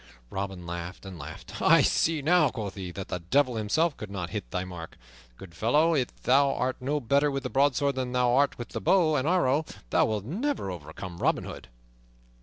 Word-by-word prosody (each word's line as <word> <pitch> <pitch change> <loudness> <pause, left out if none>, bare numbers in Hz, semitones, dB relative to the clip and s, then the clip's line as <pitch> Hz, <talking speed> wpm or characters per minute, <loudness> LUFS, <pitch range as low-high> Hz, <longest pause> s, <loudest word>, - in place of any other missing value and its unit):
Robin 95 -2 -4
laughed 85 +2 -6
and 95 -3 -8
laughed. 75 +2 -9
"I - - +6
see 160 -3 +2
now," 175 +4 +4
quoth 105 -6 -5
he, 95 -2 -6
"that 95 +2 -7
the 90 - -2
Devil 125 +8 +2
himself 145 +10 +1
could 105 - -7
not 90 -4 -5
hit - - -5
that 90 +7 -3
mark. 85 -3 -9 0.4
Good 95 -3 -12
fellow, 150 - +3
if 130 -6 -2
thou 140 +2 +4
art 130 +1 -1
no 145 +4 0
better 140 +3 +2
with 135 -1 -3
the 130 - -4
broadsword 140 +1 +2
than 130 -1 -3
thou 125 -1 +2
art 140 +2 +3
with 120 -2 -7
the - - -5
bow 170 -5 +3
and 130 +1 0
arrow, 160 -5 +3 0.3
thou - - +4
wilt 105 -2 -2
never 205 - -2
overcome 85 +2 -8
Robin - - +1
Hood." - - -8
125 Hz, 205 wpm, -28 LUFS, 95-145 Hz, 0.4 s, I